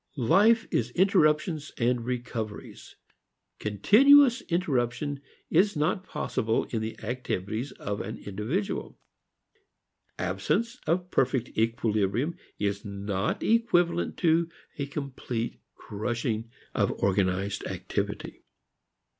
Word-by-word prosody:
Life 210 - +4
is 120 0 +1
interruptions 155 -4 +2
and 120 0 +1
recoveries. 120 -3 -5 0.6
Continuous 240 - +6
interruption 145 -4 0 0.3
is 195 +5 +4
not 155 +6 0
possible 110 -9 -1
in 115 - -1
the 110 0 -4
activities 120 0 -3
of 100 0 -4
an 110 +3 -5
individual. 110 - -3 1.2
Absence 235 +2 -1
of 180 +2 0
perfect 130 -1 +1
equilibrium 115 - +1 0.2
is 100 0 -1
not 100 0 -2
equivalent 175 -7 +2
to 165 0 +3 0.3
a 140 - -1
complete 130 -5 -4
crushing 115 +1 -3 0.2
of - - +1
organized 95 0 0
activity. - - -4
125 Hz, 95 wpm, -28 LUFS, 110-170 Hz, 1.2 s, Continuous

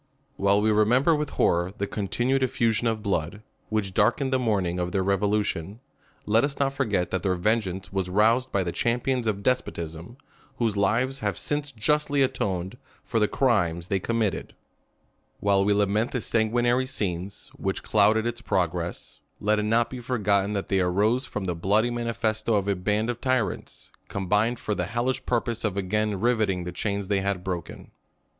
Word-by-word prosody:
While 100 +1 +3
we 110 +1 +3
remember 120 +9 +4
with 150 -1 -2
horror 85 +2 +2
the 100 - -1
continued 120 +7 -1
effu 130 -3 +1
sion 115 +3 0
of 110 -2 -1
blood, 100 +1 -2 0.3
which 105 -3 -1
darkened 120 +6 +2
the 130 - +3
morning 95 -7 0
of 90 0 -2
their 95 -2 0
revolution, 100 -1 0 0.5
let 110 +2 +3
us 140 0 -1
not 135 -1 +1
forget 105 -10 0
that 95 - -1
their 95 -2 +1
vengeance 95 -1 -1
was 95 -2 -1
roused 115 +7 +3
by 100 - +1
the 85 - -2
champions 120 +3 0
of 100 -2 -1
despotism, 85 -5 -2 0.4
whose 115 -3 0
lives 115 +7 +1
have - - -2
since 145 0 -2
justly 145 +4 +1
atoned 95 -3 -2 0.2
for 115 - -1
the 105 - +3
crimes 90 -11 +1
tliey 95 -2 0
committed^ 115 -3 -1 0.9
While 100 -1 +3
we 105 - +2
lament 105 +3 +1
the 125 - -1
sanguinary 120 +3 +1
scenes, 95 -4 -4
which 95 -1 -3
clouded 110 +1 +3
its 120 0 -3
progress, 90 -5 -2 0.2
let 105 +1 +2
it 105 0 -1
not 115 +1 +2
be 130 - -6
forgotten 105 -5 +1
that 100 -2 -2
they 95 - +1
aros<? 105 +8 +1
from 105 -2 -4
the 90 - -1
bloody 105 +8 +1
manifesto 115 -2 -1
of 100 -1 0
a 100 - +2
band 105 +5 0
of 120 - -9
tyrants, 130 -5 -2 0.2
combined 105 +5 0
for 105 - -2
the 90 -3 -1
hellish 120 +5 -1
purpose 120 -1 -1
of 100 -3 -1
again 105 +1 0
rivetting 110 -6 +1
the 90 - -5
chains 100 +2 -2
they 100 -1 +1
had 95 -2 -2
broken. 90 -2 -6
105 Hz, 175 wpm, -26 LUFS, 95-120 Hz, 0.9 s, remember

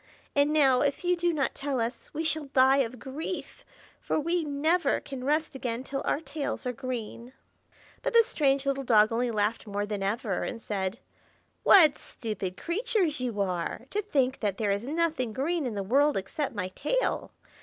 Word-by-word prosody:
And 285 +1 +4
now, 270 -5 +4
if 285 +2 0
you 360 0 +3
do 345 0 +1
not 285 -4 0
tell 275 -2 -2
us, 230 +2 -3
we 315 - -3
shall 315 -1 +1
die 270 0 +4
of 250 -1 -1
grief, 300 +9 -6 0.4
for - - -1
we 335 +3 0
never 310 +4 +1
can 270 -3 -7
rest 305 +3 0
again 250 -2 -3
till 275 0 -4
our - - +1
tails 290 -3 -4
are 250 - -1
green." 245 -1 -6 0.7
But - - -2
the 465 0 +7
strange 280 -8 +1
little 275 0 0
dog 220 -3 +5
only 240 +2 0
laughed 215 0 -1
more 205 0 -2
than 205 -1 -4
ever, 200 0 -1
and 230 - -4
said, 195 -1 -3 0.6
"What 315 -7 +7
stupid 195 -5 -5
creatures 365 - 0
you 240 -5 -3
are, 185 +4 -2
to 420 - 0
think 270 -10 0
that 205 -3 -1
there 210 -3 0
is 200 +5 -2
nothing 310 -7 0
green 300 +4 -1
in 225 - -4
the 200 - -2
world 280 +7 +3
except 245 +8 -3
my 185 -2 -2
tail. - - -1
270 Hz, 185 wpm, -28 LUFS, 225-305 Hz, 0.7 s, the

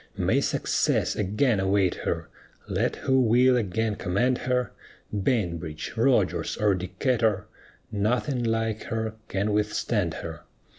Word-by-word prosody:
May - - +2
success - - +1
again 105 +3 +1
await 95 -1 +2
her, - - -3 0.4
Let - - 0
who 130 0 +2
will 125 +2 +5
again 110 -1 0
command 120 +8 +1
her, 125 -1 +1 0.4
Bainbridge, 90 - -1
Rodgers, - - +2
or 105 -2 +3
Decatur 105 +2 0 0.5
Nothing 120 +5 0
like 115 -1 -1
her 110 -1 -2
can 100 +2 -1
withstand 105 -3 0
her. 80 -2 -7
110 Hz, 115 wpm, -26 LUFS, 95-120 Hz, 0.5 s, will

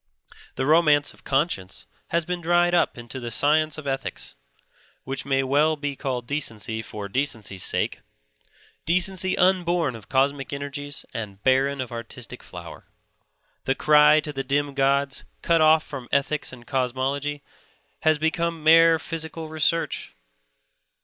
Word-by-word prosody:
The 130 - -1
romance 150 -1 +4
of - - -21
conscience 135 - -1 0.2
has 170 -1 0
been 180 0 -3
dried 175 +1 +3
up 175 - +2
into 120 +2 -7
the 120 -1 -5
science 155 +5 +2
of 155 - -8
ethics; 135 -1 -4 0.7
which 135 +1 -4
may 135 -1 +2
well 145 +4 +3
be 145 -1 -4
called 130 -3 -3
decency 115 -5 -2
for 105 -2 -7
decency's 105 -5 -2
sake, - - -1 0.9
decency 185 +2 +2
unborn 175 -6 +2
of 110 -3 -12
cosmic 135 +1 +1
energies 145 0 -5
and 105 -3 -6
barren 135 +2 +2
of 125 -2 -4
artistic 115 -1 -7
flower. - - -10 0.8
The 135 - +1
cry 150 +1 +6
to 150 0 -6
the 135 -1 -3
dim 140 +1 0
gods, 140 0 +1 0.2
cut 165 -1 +3
off 155 0 +5
from 130 -4 -8
ethics 140 +1 0
and 120 -2 -12
cosmology, 135 +3 -2 0.6
has 155 -1 +3
become 165 +1 -1
mere 165 +1 +7
Psychical 160 0 -6
Research. 160 - -1
145 Hz, 140 wpm, -24 LUFS, 130-160 Hz, 0.9 s, mere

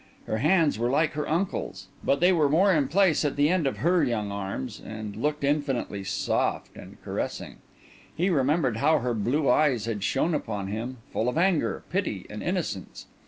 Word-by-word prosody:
Her 110 - -2
hands 155 - +3
were 120 +1 +1
like 150 +4 +2
her 150 0 -4
uncle's; 155 - -2 0.2
but 140 - +1
they 180 +1 +5
were 155 -5 +3
more 185 +6 +4
in 145 -5 +2
place 180 +1 +3
at 145 - 0
the 145 +1 +3
end 175 -5 +2
of 135 - -2
her 175 +2 +2
young 105 -4 -1
arms, 100 +3 -5
and 110 -1 -7
looked 150 +5 -2
infinitely 140 -8 -1
soft 95 0 -1
and - - -12
caressing. - - -4 0.6
He 180 +4 +2
remembered 140 -4 +1
how 155 +6 +3
her 125 -3 -1
blue 125 +7 0
eyes 125 -4 +3
had 110 -4 -3
shone 160 +9 +1
upon 105 -9 -3
him, 115 +5 -4 0.2
full 115 - +1
of 125 - -3
anger, 175 -2 +1
pity, - - -2
and - - -6
innocence. - - -3
140 Hz, 185 wpm, -26 LUFS, 115-160 Hz, 0.6 s, they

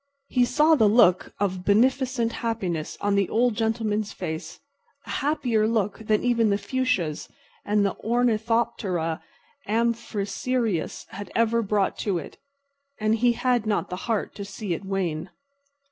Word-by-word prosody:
He 250 -1 +3
saw 305 +5 +4
the 220 -9 +5
look 200 -5 +4
of 190 -2 -1
beneficent 240 +3 +2
happiness 190 -9 -3
on 205 0 +1
the 200 -2 +2
Old 240 +1 +2
Gentleman's 220 -1 -1
face—a 160 -2 -5 0.5
happier 245 -7 +1
look 215 -3 0
than 215 -1 0
even 235 -3 +3
the 200 - +2
fuchsias 205 - -1 0.3
and 205 0 +2
the 195 - 0
ornithoptera 220 -7 0 0.5
amphrisius 230 -2 -1
had 200 +2 -8
ever 230 0 +3
brought 205 -2 0
to 200 -4 0
it—and 280 - -5
he 240 +1 +3
had 245 -2 +1
not 205 -3 0
the - - -2
heart 220 -3 0
to 200 - -6
see 200 -1 -4
it 170 - -5
wane. 185 -4 -2
220 Hz, 135 wpm, -25 LUFS, 195-240 Hz, 0.5 s, the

